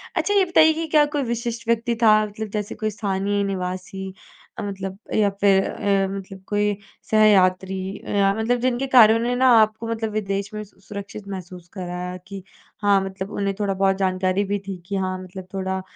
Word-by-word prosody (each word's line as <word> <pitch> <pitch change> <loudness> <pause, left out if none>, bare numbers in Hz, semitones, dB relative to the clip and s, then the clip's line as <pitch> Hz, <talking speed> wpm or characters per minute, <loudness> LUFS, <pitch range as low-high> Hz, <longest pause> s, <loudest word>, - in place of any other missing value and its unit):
अच्छा, 410 - +1
ये 390 -2 +4
बताइए 320 -2 +5
कि 325 0 -3
क्या 300 -1 +4
कोई 285 - +1
विशिष्ट 235 -1 -3
व्यक्ति 235 0 +1
था 215 -1 +6
मतलब 215 +1 -6
जैसे 210 -1 -3
कोई 215 -1 -2
स्थानीय 200 -1 -1
निवासी 190 0 -4 0.5
अ, - - -2
मतलब 195 -1 -5 0.2
या 205 -2 +3
फिर 195 -1 +3
अ, 195 -1 0
मतलब 195 -1 -8
कोई 205 -1 0 0.3
सहयात्री 190 -3 +4 0.2
अ, - - -11
या 195 -1 +3
मतलब 235 +2 0
जिनके 255 +2 0
कारणों 230 -3 +7
ने 245 +1 0
ना 260 +1 +3
आपको 220 +1 0
मतलब 225 -1 -2
विदेश 200 0 -3
में 215 0 -4
सु 200 -1 -20
सुरक्षित 200 +1 -8
महसूस 180 -2 -8
कराया 180 -1 -5
कि 195 -2 -8 0.4
हाँ, 200 -1 +4
मतलब 190 +1 -6
उन्हें 200 -1 -1
थोड़ा 200 -1 0
बहुत 195 0 +2
जानकारी 185 +1 +1
भी 200 0 -2
थी 190 -2 -4
कि 200 - -3
हाँ, 185 -1 -1
मतलब 185 0 -10
थोड़ा 190 0 -2
200 Hz, 190 wpm, -23 LUFS, 190-220 Hz, 0.5 s, कारणों